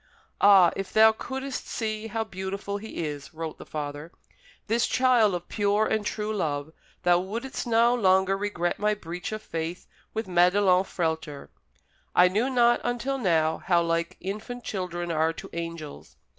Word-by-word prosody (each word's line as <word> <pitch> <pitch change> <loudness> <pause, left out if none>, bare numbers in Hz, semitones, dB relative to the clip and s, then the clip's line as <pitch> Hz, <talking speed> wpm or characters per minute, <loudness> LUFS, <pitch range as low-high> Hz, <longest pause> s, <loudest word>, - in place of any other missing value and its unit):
"Ah, 195 -4 +7
if 195 - -5
thou 220 0 +7
couldst 265 +4 -5
see 215 -1 -3
how 225 +1 -2
beautiful 195 0 -5
he 205 -6 -5
is," 145 -1 -7
wrote 160 -1 -6
the - - -11
father, 150 +1 -5 0.5
"this 230 +2 +1
child 245 -6 +3
of 175 0 -6
pure 205 0 +1
and 220 -1 0
true 215 0 -2
love, 155 -5 -2 0.3
thou 175 0 +4
wouldst 230 +8 -4
no 235 +1 +4
longer 190 -4 +3
regret 195 -4 -2
my 210 0 +2
breach 175 -2 -6
of 215 0 -5
faith 165 +2 -5 0.3
with 220 -1 -3
Madelon 180 +1 +4
Frehlter. 160 -5 -3 0.7
I 180 0 +6
knew 220 +8 +1
not 240 -2 +3
until 245 +3 -2
now 160 -7 +2
how 175 -1 +2
like 170 0 -1
infant 215 +6 -6
children 175 -3 -4
are 160 0 +1
to - - -10
angels. 165 -3 -7
190 Hz, 155 wpm, -26 LUFS, 170-220 Hz, 0.7 s, Ah